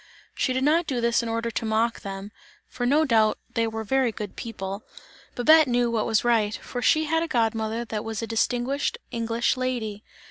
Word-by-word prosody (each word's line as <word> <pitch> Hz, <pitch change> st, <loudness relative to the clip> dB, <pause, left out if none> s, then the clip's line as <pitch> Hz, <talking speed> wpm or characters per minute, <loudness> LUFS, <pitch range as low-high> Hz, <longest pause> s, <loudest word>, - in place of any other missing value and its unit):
She 260 Hz, -, 0 dB
did 260 Hz, +1 st, 0 dB
not 320 Hz, +4 st, +3 dB
do 260 Hz, -4 st, -1 dB
this 235 Hz, +1 st, +2 dB
in 235 Hz, -, -4 dB
order 230 Hz, +1 st, -2 dB
to 230 Hz, -, -3 dB
mock 225 Hz, +1 st, +1 dB
them, 195 Hz, +1 st, -7 dB, 0.4 s
for 245 Hz, -1 st, -3 dB
no 300 Hz, +4 st, +4 dB
doubt 220 Hz, -5 st, +3 dB, 0.2 s
they 230 Hz, 0 st, +1 dB
were 220 Hz, 0 st, -4 dB
very 260 Hz, +2 st, +1 dB
good 210 Hz, -2 st, -7 dB
people, 200 Hz, -3 st, -5 dB
yes! -, -, -26 dB
kind -, -, -12 dB
and -, -, -23 dB
amiable. -, -, -25 dB
Babette 310 Hz, +5 st, +6 dB
knew 240 Hz, -1 st, +2 dB
what 225 Hz, -2 st, 0 dB
was 225 Hz, -1 st, +2 dB
right, 225 Hz, -3 st, +2 dB
for 245 Hz, -, -6 dB
she 310 Hz, +5 st, +4 dB
had 325 Hz, +1 st, +1 dB
a 335 Hz, -, -1 dB
god 230 Hz, -6 st, +1 dB
mother 225 Hz, +1 st, -3 dB
that 215 Hz, -2 st, -4 dB
was 225 Hz, 0 st, -4 dB
a -, -, 0 dB
distinguished 245 Hz, -, 0 dB
English 230 Hz, 0 st, 0 dB
lady. 235 Hz, -5 st, -3 dB
230 Hz, 225 wpm, -25 LUFS, 220-255 Hz, 0.4 s, Babette